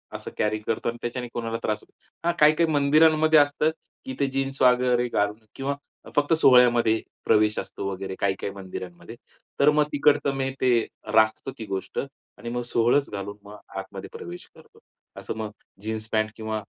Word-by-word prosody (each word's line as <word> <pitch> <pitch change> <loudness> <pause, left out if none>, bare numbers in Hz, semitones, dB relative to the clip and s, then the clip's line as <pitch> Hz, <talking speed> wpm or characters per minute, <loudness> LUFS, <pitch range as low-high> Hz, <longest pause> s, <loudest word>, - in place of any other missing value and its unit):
असं - - -7
कॅरी 110 0 0
करतो. 110 +2 -2
आणि 120 - -5
त्याच्याने 120 +1 -4
कोणाला 115 -1 -3
त्रास 105 -1 0
होतो. - - -24 0.3
हां. 170 - +3
काही-काही 155 +2 +5
मंदिरांमध्ये 155 +2 +5
असतं 145 +2 +2 0.3
की 130 - -5
ते 140 - +2
जीन्स 135 0 -2
वगैरे 125 -1 +4
घालून 105 0 0 0.2
किंवा 140 +1 -2 0.4
फक्त 145 +2 +3
सोहळ्यामध्ये 120 -6 +5 0.2
प्रवेश 105 -1 +3
असतो, 100 - -6
वगैरे 95 0 -5
काही-काही 100 0 -1
मंदिरांमध्ये. 95 +1 -8 0.4
तर 145 - +6
मग 150 0 +3
तिकडचं 145 -1 +3
मी 135 0 -1
ते 130 - +4 0.4
राखतो 110 +4 +3
ती 110 - -5
गोष्ट 95 -2 -4 0.4
आणि 120 - -7
मग 120 +1 -2
सोवळंच 120 +5 +3
घालून 100 0 -5
मग 105 +1 -11 0.2
आतमध्ये - - -7
प्रवेश 85 +1 -9
करतो. - - -19 0.4
असं 110 - -6
मग 110 -1 -4 0.3
जीन्स 110 0 -4
पॅन्ट 110 0 +1
किंवा 110 -1 -3
120 Hz, 165 wpm, -25 LUFS, 105-140 Hz, 0.4 s, तर